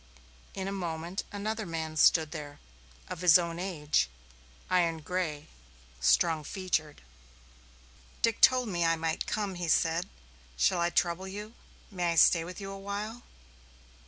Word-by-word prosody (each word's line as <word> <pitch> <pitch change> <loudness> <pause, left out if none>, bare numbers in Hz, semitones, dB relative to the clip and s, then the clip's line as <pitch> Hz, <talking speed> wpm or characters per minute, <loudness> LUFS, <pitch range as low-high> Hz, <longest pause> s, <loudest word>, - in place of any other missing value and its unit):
In 190 0 -3
a - - -2
moment 175 -1 -4
another 215 +2 -3
man 160 -3 -4
stood 155 0 +4
there, 150 -3 -7 0.5
of 180 - -6
his 180 -1 +8
own 170 -1 -3
age, 155 - 0 0.6
iron 170 -3 +1
gray, 155 -3 -3 0.5
strong 160 - +3
featured. 160 - -3 1.2
"Dick 230 -1 +2
told 255 -2 +6
me 175 -4 -1
I 165 0 +3
might 160 0 -2
come," 205 -2 -2
he 175 -1 -4
said. 165 +3 +2 0.5
"Shall 65 - +2
I 170 - +2
trouble 175 +2 0
you? 210 +3 -7 0.4
May 175 -3 0
I - - -4
stay 165 +1 +6
with 180 +4 -8
you 195 -1 -6
awhile?" 200 +4 -5
175 Hz, 140 wpm, -30 LUFS, 160-195 Hz, 1.2 s, his